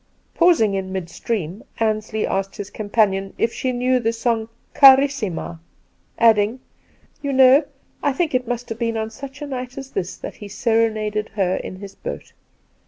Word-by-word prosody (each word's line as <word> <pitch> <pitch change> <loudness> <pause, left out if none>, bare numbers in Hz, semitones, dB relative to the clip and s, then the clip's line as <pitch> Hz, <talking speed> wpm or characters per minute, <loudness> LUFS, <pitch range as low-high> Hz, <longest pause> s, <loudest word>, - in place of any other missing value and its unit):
Pausing 330 - +4
in 190 -1 -3
midstream, 190 +1 -4 0.2
Ansley 215 -1 0
asked 195 0 -2
his 205 0 -7
com 210 -1 -6
panion 195 -3 +1
if 230 - 0
she 260 - -1
knew 250 +1 +1
the 225 -1 0
song 230 -1 -1
' - - -41
Carissima,' 265 - +5 0.6
adding, 225 +1 +4 0.6
'You 280 - -2
know, 265 +2 +6 0.4
I 285 - +2
think 305 +3 -1
it 250 -1 0
must 245 0 -3
have 225 0 -5
been 230 -1 -1
on 220 0 -3
such 275 +4 -9
a - - -3
night 255 -2 -6
as 270 -1 -7
this 180 - -3
that - - -8
he 205 - -9
serenaded 215 -2 0
her 190 -3 +1
in - - -6
his 195 +1 -10
boat. - - -7
225 Hz, 170 wpm, -21 LUFS, 205-255 Hz, 0.6 s, know